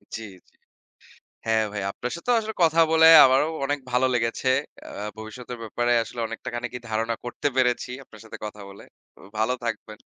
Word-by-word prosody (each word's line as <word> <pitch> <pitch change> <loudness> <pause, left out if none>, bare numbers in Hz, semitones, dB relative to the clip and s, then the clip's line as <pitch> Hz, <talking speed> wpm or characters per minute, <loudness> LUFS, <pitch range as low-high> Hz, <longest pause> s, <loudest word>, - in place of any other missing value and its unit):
জি, 115 - -6 0.2
জি। - - -31 0.9
হ্যাঁ, 110 0 +2
ভাই 105 -1 -4
আপনার 125 +4 -5
সাথে 210 - -8
আসলে 220 0 -5
কথা 165 0 +3
বলে 160 0 +6 0.2
আমারও 135 +4 +3 0.2
অনেক 145 +1 -1
ভালো 125 +1 +3
লেগেছে। 115 +2 -1 0.4
আ - - -9 0.3
ভবিষ্যতের 120 +3 -8
ব্যাপারে 120 +2 0
আসলে 120 +2 -9
অনেকটা 115 +3 -7
খানিকই 125 +1 -5
ধারণা 115 +1 -1
করতে 120 +4 -2
পেরেছি 125 -1 +1
আপনার 110 -3 -16
সাথে - - -9
কথা 105 -1 -8
বলে। 100 - -13 0.3
তো - - -24 0.2
ভালো 110 +4 +1
থাকবেন। 110 -2 -5
120 Hz, 170 wpm, -24 LUFS, 110-130 Hz, 0.9 s, বলে